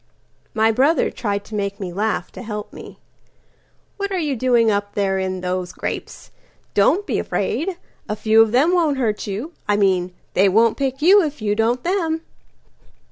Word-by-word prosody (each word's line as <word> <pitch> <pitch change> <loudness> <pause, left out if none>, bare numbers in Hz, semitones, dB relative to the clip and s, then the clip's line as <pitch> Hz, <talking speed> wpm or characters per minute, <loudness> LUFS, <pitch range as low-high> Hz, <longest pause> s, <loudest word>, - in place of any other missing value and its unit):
My 220 +1 +3
brother 275 +8 +2
tried 200 -3 -3
to - - -13
make 200 0 -3
me 185 -3 -5
laugh 210 -2 -2
to - - -9
help 210 -3 -6
me."What 400 0 -12
are 380 - -1
you 300 -6 -1
doing 235 -2 +3
up 205 0 -2
there 195 -1 0
in 185 -1 -3
those 180 0 -3
grapes? - - -6 0.4
Don't 325 - +3
be - - -1
afraid. 360 +2 -2 0.3
A 210 - -1
few 220 +1 +4
of 225 -1 +3
them 285 +9 +3
won't 320 -6 +2
hurt 220 -6 -1
you.I 210 - -3
mean, 185 -3 +2 0.2
they 195 +1 +4
won't 225 +3 +3
pick 270 +1 -2
you 395 +5 +7
if 300 -4 -3
you 210 -2 0
don't 230 +3 0
them." 335 -3 0
220 Hz, 170 wpm, -21 LUFS, 200-295 Hz, 0.4 s, you